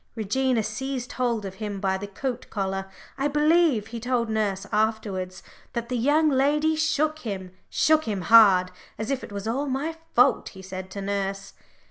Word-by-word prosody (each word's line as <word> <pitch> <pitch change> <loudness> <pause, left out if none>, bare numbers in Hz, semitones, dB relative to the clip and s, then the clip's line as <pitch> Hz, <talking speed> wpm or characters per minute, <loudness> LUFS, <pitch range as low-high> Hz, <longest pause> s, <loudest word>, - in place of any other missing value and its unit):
Regina 235 +2 +1
seized 250 +3 -4
hold 235 -4 -1
of 190 - -5
him 205 -2 -3
by 190 -1 0
the 195 +2 -5
coat 245 +5 -5
collar, 195 -1 -3 0.3
I 275 - +2
believe; 300 -5 +3
he 230 +1 -7
told 235 -1 -1
nurse 205 -3 -1
afterwards 210 -4 -1 0.3
that 235 0 -3
the 250 - -1
young 290 +6 +3
lady 300 +3 +2
shook 310 0 +1
him, 195 -8 -5 0.2
shook 315 0 +3
him 205 -4 -2
hard, 190 -4 +6 0.3
"as 220 +4 -3
if 270 -1 -2
it - - -9
was 200 +1 -5
all 270 +6 -1
my 285 +5 -2 0.2
fault," 250 +3 +4
he 190 -1 -12
said 185 0 -7
to 200 +1 -6
nurse. 195 0 -3
225 Hz, 175 wpm, -25 LUFS, 195-270 Hz, 0.3 s, hard